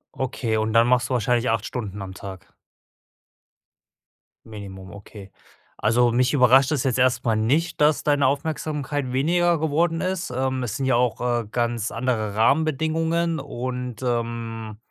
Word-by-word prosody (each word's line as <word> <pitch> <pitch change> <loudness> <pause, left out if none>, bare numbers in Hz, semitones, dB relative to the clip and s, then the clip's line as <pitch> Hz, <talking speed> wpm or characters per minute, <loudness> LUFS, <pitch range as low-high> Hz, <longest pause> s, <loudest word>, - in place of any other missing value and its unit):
Okay, 120 -3 -2
und 110 0 -1
dann 115 0 +5
machst 125 0 +2
du - - -1
wahrscheinlich 120 +1 +1
8 115 0 0
Stunden 105 -5 -5
am 95 - -8
Tag. 95 -1 -10 1.9
Minimum, 100 -3 -10
okay. 100 -1 -12 0.5
Also, 120 +2 +2
mich 125 +4 +2
überrascht 130 +1 +5
das 145 -3 0
jetzt 130 -3 0
erstmal 125 -2 +2
nicht, 150 +11 0
dass 150 +1 +3
deine 145 -3 +3
Aufmerksamkeit 145 -1 -2
weniger 170 +5 +2
geworden 165 +2 0
ist. 185 -7 -2
Ähm 130 0 -1
es 115 -5 -3
sind 135 - -2
ja 130 -2 +2
auch, 120 -1 +1
äh, 120 -2 0
ganz 120 -2 -1
andere 115 -3 -2
Rahmenbedingungen 160 +6 +1
und, 125 -3 -5
ähm 115 -3 -3
125 Hz, 145 wpm, -23 LUFS, 115-145 Hz, 1.9 s, dann